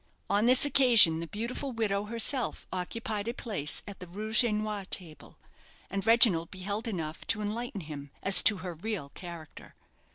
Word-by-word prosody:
On 205 +3 +2
this 255 +3 +6
occasion 235 - +6
the 170 - -6
beautiful 235 - -5
widow 205 -3 -2
herself 235 +3 0
occupied 205 +3 -4
a 235 - -4
place 195 - -4
at 200 - -10
the 180 - -10
rouge 215 +7 +1
et 235 - 0
noir 210 -1 -3
table, 170 -5 -6 0.5
and 195 0 -3
Reginald 220 -8 +4
beheld 200 +5 -5
enough 165 -7 -6
to 225 - +1
enlighten 215 0 -5
him 145 -3 -9
as 195 0 +7
to 210 - +3
her 180 - -5
real 180 -3 -6
character. 170 -1 -12
205 Hz, 165 wpm, -28 LUFS, 175-230 Hz, 0.5 s, as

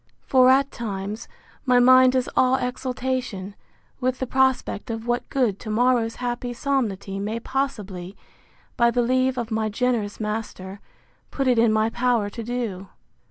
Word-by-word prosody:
—For, 255 -1 +5
at 270 +1 +4
times, 210 -1 -5 0.4
my 250 -2 +3
mind 255 +1 +6
is 255 -1 +1
all 255 0 +4
exultation, 250 -5 -3 0.5
with 255 0 0
the 260 - -2
prospect 260 -4 0
of 225 0 -4
what 240 0 -2
good 240 -8 0
to 220 - -8
morrow's 230 0 +2
happy 245 0 -3
solemnity 225 -8 -2
may 215 +3 -3
possibly, 210 -9 -4 0.6
by 235 -2 +4
the 240 +1 +1
leave 255 +1 +1
of 235 -2 -3
my 220 0 0
generous 225 -2 -1
master, 210 -3 -5 0.5
put 275 -1 -2
it 245 -2 +3
in 230 -1 +4
my 220 +1 +1
power 235 -4 0
to 230 - -6
do. 225 -5 -4
240 Hz, 155 wpm, -23 LUFS, 215-255 Hz, 0.6 s, mind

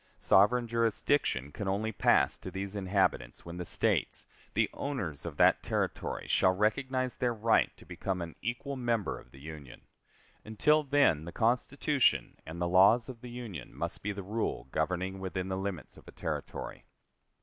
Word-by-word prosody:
Sovereign 105 +6 +4
jurisdiction 115 - +1
can 100 +6 -5
only 105 +3 0
pass 100 - +3
to - - -7
these 95 +1 -5
inhabitants 95 -11 0
when 85 +1 -7
the 90 - -4
States, - - 0 0.3
the - - +3
owners 95 - -4
of 75 -3 -7
that - - +5
Territory - - -2
shall 95 0 +3
recognize 130 +5 0
their 120 -2 -1
right 110 +1 +3
to - - -16
become 95 -2 -3
an 85 -2 -5
equal 125 +4 -3
member 120 -5 -1
of - - -17
the 65 - -15
Union. 75 -3 -10 0.6
Until 150 +8 +3
then, 140 - +3
the 85 - -6
Constitution 125 - +1
and 80 +2 -7
the 85 - 0
laws 100 +7 +5
of 120 -3 -9
the 125 - -8
Union 115 - -7
must - - -4
be 105 - -2
the 100 -1 -6
rule 105 - -2
governing 95 +1 -1
within 95 0 -3
the 95 - -1
limits 95 -4 -5
of - - -16
a - - -10
Territory. - - -5
100 Hz, 170 wpm, -31 LUFS, 90-120 Hz, 0.6 s, that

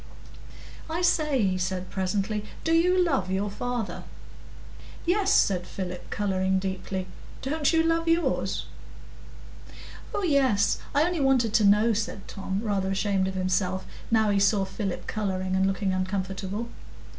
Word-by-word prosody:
"I 335 +3 -2
say," 300 -8 +2
he 185 -1 +1
said 185 0 -3
presently, 200 +2 -1 0.2
"do 325 - +1
you 360 +2 +4
love 270 - 0
your 195 +2 -1
father?" 245 0 -3 1.0
"Yes," 385 +3 +2
said 180 -2 +3
Philip, 180 -2 -6
colouring 190 -2 0
deeply; 190 0 -3 0.4
"don't 295 +2 +1
you 325 -1 +3
love 330 0 +1
yours?" 330 +1 +1 1.5
"Oh 410 - -2
yes—I 280 - +2
only 350 0 0
wanted 255 -5 +3
to 220 -3 +4
know," 210 +3 +5
said 210 -2 -3
Tom, 195 0 -4
rather 195 -3 0
ashamed 195 -1 +1
of 190 - -4
himself, 185 0 0 0.2
now 220 -2 +3
he 200 - +2
saw 200 0 +3
Philip 195 -1 -4
colouring 190 -3 -2
and 190 0 +3
looking 195 0 0
uncomfortable. 190 +3 -3
200 Hz, 135 wpm, -27 LUFS, 190-265 Hz, 1.5 s, know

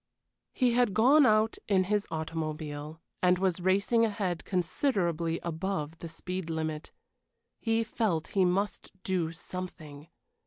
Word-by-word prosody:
He 250 -2 +2
had 240 -5 +2
gone 265 +5 +6
out 215 +1 +3
in 190 -2 +3
his 205 +2 0
automobile, 155 -1 -4 0.2
and 180 0 +4
was 185 -1 0
racing 200 +5 +3
ahead 200 -6 -1
considerably 175 - 0
above 165 -2 -3
the 170 - -6
speed 180 +1 -5
limit. 160 -1 -3 0.7
He 225 0 +1
felt 215 -8 -1
he 195 - +2
must 190 +3 0
do 175 -4 0
something. 165 -4 -8
180 Hz, 125 wpm, -30 LUFS, 160-205 Hz, 0.7 s, gone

